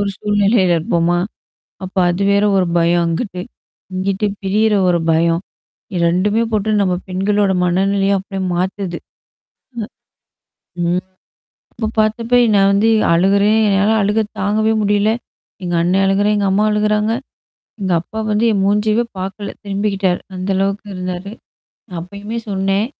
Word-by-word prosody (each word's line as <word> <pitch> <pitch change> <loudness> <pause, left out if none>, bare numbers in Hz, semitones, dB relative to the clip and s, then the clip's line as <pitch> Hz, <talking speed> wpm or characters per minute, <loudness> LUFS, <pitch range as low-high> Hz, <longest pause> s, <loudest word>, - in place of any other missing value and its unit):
ஒரு 200 - 0
சூழ்நிலையில 205 -3 +2
இருப்போமா? 170 +1 +1 0.7
அப்ப 185 - -11
அது 180 +3 -1
வேற 200 0 +3
ஒரு 185 - +2
பயம் 170 +1 +3
அங்கிட்டு. 180 +2 -3 0.5
இங்குட்டு 195 +2 -1
பிரியற 210 +2 +2
ஒரு 170 -1 +2
பயம். 165 +1 +2 0.7
2மே 205 +6 +1
போட்டு 215 0 0
நம்ம 185 -2 +1
பெண்களோட 200 +2 +1
மனநிலைய 195 +2 +1
அப்படியே 195 -1 -6
மாத்துது. 185 0 -2 1.8
ம். 170 - +1
ம். 185 - -1 0.7
அப்ப 220 -2 -3
பார்த்தப்ப 225 +3 +1 0.2
நான் 195 0 +4
வந்து 210 +3 +3 0.2
அழுகுறேன், 200 +5 +3
என்னால 200 +2 +2
அழுக 210 +2 +1 0.2
தாங்கவே 215 +2 +1
முடியல. 205 +1 +2 0.5
எங்க 175 -1 -2
அண்ண 175 +2 +1
அழுகுறான். 205 +2 +2
எங்க 200 -1 0
அம்மா 210 +2 +2
அழுகுறாங்க. 210 +1 +1 0.7
எங்க 185 -2 -1
அப்பா 220 +5 -8
வந்து 215 +3 +2
என் 200 - +1
மூஞ்சவே 210 +3 +2 0.2
பார்க்கல. 195 +2 -5
திரும்பிக்கிட்டாரு. 195 -2 -1 0.2
அந்த 185 +1 -4
அளவுக்கு 195 +2 -1
இருந்தாரு. 185 +2 -5 0.7
அப்பயுமே 200 +6 -7
சொன்னேன். 195 +2 0
200 Hz, 130 wpm, -17 LUFS, 185-210 Hz, 1.8 s, நான்